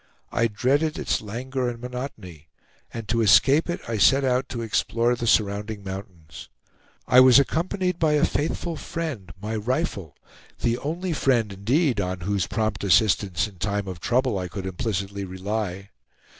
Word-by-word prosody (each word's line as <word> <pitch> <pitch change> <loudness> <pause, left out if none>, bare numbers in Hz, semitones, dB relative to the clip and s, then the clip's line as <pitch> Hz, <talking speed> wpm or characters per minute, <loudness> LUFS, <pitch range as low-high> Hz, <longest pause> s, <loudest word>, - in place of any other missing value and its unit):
I 115 - +2
dreaded 140 +9 0
its - - -1
languor 125 +4 -3
and 120 -1 -7
monotony, 115 - -7 0.4
and 115 -2 -7
to 115 +2 +1
escape 135 - +5
it, 175 - -2
I 115 -2 -2
set 135 +7 +5
out 130 +1 0
to 115 -2 -4
explore 115 +2 +1
the 120 -1 -4
surrounding 105 0 +1
mountains. 95 -7 -9 0.6
I 125 - +7
was 130 -1 +8
accompanied 180 +5 0
by 155 -2 +3
a 150 - +4
faithful 165 +2 -2
friend, 145 - -5
my 110 +2 -4
rifle, 110 - -2 0.5
the 120 0 +1
only 170 +4 -3
friend 120 -8 +1
indeed 120 - +1
on 90 -1 -3
whose 100 0 -1
prompt 110 -2 -2
assistance 100 -2 +3
in 95 -4 -16
time 100 +1 -2
of 90 -3 -6
trouble 125 +1 +1
I 90 - -3
could 95 +1 -6
implicitly 100 +1 -3
rely. 95 +1 -4
110 Hz, 155 wpm, -24 LUFS, 100-130 Hz, 0.6 s, was